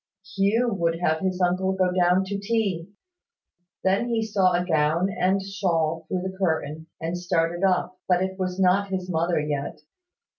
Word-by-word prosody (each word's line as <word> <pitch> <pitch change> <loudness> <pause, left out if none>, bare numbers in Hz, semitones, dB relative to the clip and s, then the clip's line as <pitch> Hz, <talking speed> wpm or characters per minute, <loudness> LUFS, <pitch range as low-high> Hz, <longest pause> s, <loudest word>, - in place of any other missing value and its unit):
Hugh 220 +4 +2
would 170 -3 0
have 160 -2 +1
his 185 0 -2
uncle 185 +1 +1
go 185 -1 +1
down 180 +1 +3
to 200 +1 -4
tea. 200 -5 -1 0.9
Then 195 +6 +1
he 225 -1 0
saw 195 -4 +2
a 175 0 +1
gown 160 +2 +2
and 190 +1 +1
shawl 165 -5 -1
through 185 -1 -2
the 190 0 -4
curtain, 160 -3 -1
and 165 +2 -3
started 175 0 -1
up; 185 -1 +1
but 180 0 +3
it 190 0 -4
was 185 0 -2
not 190 +2 +3
his 185 -1 -3
mother 170 0 +1
yet. 150 +1 -3
185 Hz, 170 wpm, -25 LUFS, 170-190 Hz, 0.9 s, down